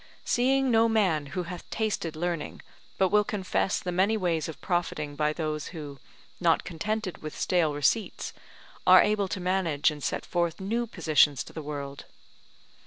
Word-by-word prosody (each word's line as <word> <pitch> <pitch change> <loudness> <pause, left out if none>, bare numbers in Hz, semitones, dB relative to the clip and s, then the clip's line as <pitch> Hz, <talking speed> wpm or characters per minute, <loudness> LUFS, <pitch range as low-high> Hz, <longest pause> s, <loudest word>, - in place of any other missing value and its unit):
seeing 265 +1 +2
no 230 0 +4
man 185 -10 +2
who 180 +5 -3
hath 175 +1 -8
tasted 210 -7 -2
learning, 170 -1 -3 0.4
but 190 -1 +3
will 210 +1 +4
confess 195 -2 -1
the 180 - -4
many 195 +5 +2
ways 170 -5 0
of 155 -2 -8
profiting 160 -5 -2
by 150 0 +1
those 155 -2 -3
who, 145 -5 -8 0.4
not - - +3
contented 205 +3 -3
with 155 -1 -7
stale 165 -5 +1
receipts, 195 +9 0 0.5
are - - +9
able 205 -2 +1
to 185 +1 -4
manage 180 -5 +1
and 150 -1 -8
set 120 - -2
forth 170 -1 -1
new 230 +5 -1
positions 155 - +3
to - - -14
the 160 - -5
world. 140 -2 -6
175 Hz, 165 wpm, -28 LUFS, 150-205 Hz, 0.5 s, are